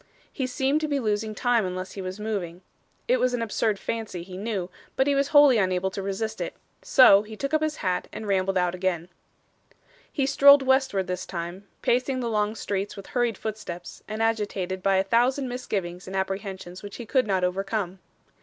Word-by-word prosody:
He 260 - -2
seemed 270 +4 +1
to 310 - 0
be 285 -2 0
losing 215 -2 -1
time 245 -2 +2
unless 185 0 -4
he 195 - -6
was 185 +2 -6
moving. 190 -5 -4 0.4
It - - +3
was 250 -1 +2
an 235 - -2
absurd 215 -1 0
fancy, 215 -5 -4
he 180 +1 -10
knew, 195 -3 -3 0.2
but 265 - +3
he 285 - +2
was 275 0 +2
wholly 290 -5 +6
unable 185 -1 +1
to 195 - -4
resist 205 +3 -3
it. - - -4 0.3
So, 205 -7 +7
he 215 +1 -9
took 275 +5 -3
up 310 - +3
his 310 -1 0
hat 180 -1 0
and 220 - -7
rambled 195 -1 +1
out 180 -1 +1
again. 180 -2 -2 1.0
He 275 - 0
strolled 280 0 +7
westward 265 -7 +2
this 180 0 -4
time, 180 +2 -6 0.2
pacing 255 +2 +1
the 235 -2 -2
long 210 0 0
streets 200 -1 -3
with 195 - -8
hurried 240 -4 +1
footsteps, 210 -5 -6
and 215 +1 -2
agitated 205 -4 -1
by 195 +1 +2
a 190 - +3
thousand 245 +6 +2
misgivings 195 -8 -4
and 190 - -6
apprehensions 190 -1 -4
which 205 -1 -8
he 240 - -7
could 255 +1 +1
not 190 -2 +1
overcome. 195 +1 -2
205 Hz, 195 wpm, -26 LUFS, 185-245 Hz, 1.0 s, So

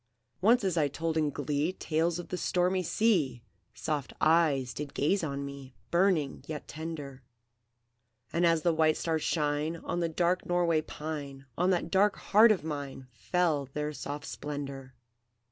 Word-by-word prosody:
"Once 230 +4 +5
as 185 -3 0
I 150 -2 +3
told 160 +3 -3
in 155 -2 +2
glee 145 +4 -1
Tales 165 0 0
of 175 - -7
the - - -2
stormy 180 +1 +1
sea, 165 - +1 0.3
Soft 150 -4 -3
eyes 155 -6 +3
did 150 -1 -6
gaze 175 +7 +1
on 140 -2 -3
me, 140 -2 -9 0.2
Burning 170 -6 +2
yet 155 -2 -6
tender; 150 -4 -6 1.1
And 170 - +1
as 165 -2 +3
the 170 - +3
white 160 -1 +3
stars 160 -2 -1
shine 150 +1 0
On 170 +1 -4
the 170 -1 0
dark 175 +2 +1
Norway 175 -3 +2
pine, 145 -3 -6
On 180 +2 +2
that 180 -2 0
dark 200 +1 +4
heart 220 +2 +5
of 200 - +1
mine 140 -4 -5
Fell 150 +3 0
their 150 0 -2
soft 145 0 -6
splendour. 140 -3 -6
155 Hz, 160 wpm, -30 LUFS, 145-175 Hz, 1.1 s, Once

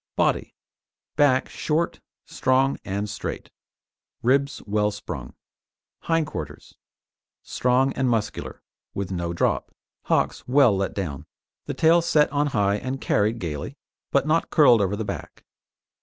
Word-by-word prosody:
BODY - - 0 0.6
Back 140 -3 +3
short, 165 +2 -1 0.3
strong 130 +1 +1
and 100 +1 -3
straight; - - -6 0.7
ribs 140 +3 +2
well 105 0 +1
sprung. 65 -12 -7 0.6
HIND 165 -1 +1
QUARTERS - - -8 0.7
Strong 125 +2 +1
and 130 -2 0
muscular, 115 -3 -3 0.3
with 100 -1 -3
no 85 -2 -2
drop; 85 - 0 0.3
hocks - - 0
well 130 -4 +5
let 95 0 -2
down; 80 -9 -4 0.4
the - - -3
tail 165 +2 +5
set 155 -4 +3
on 145 +1 +1
high 100 -6 +1
and 130 +5 -4
carried 110 0 +1
gaily, 75 -8 -5 0.3
but - - +2
not 160 +2 +1
curled 125 -8 +6
over 100 0 0
the 110 +1 -4
back. - - -7
125 Hz, 130 wpm, -24 LUFS, 100-140 Hz, 0.7 s, curled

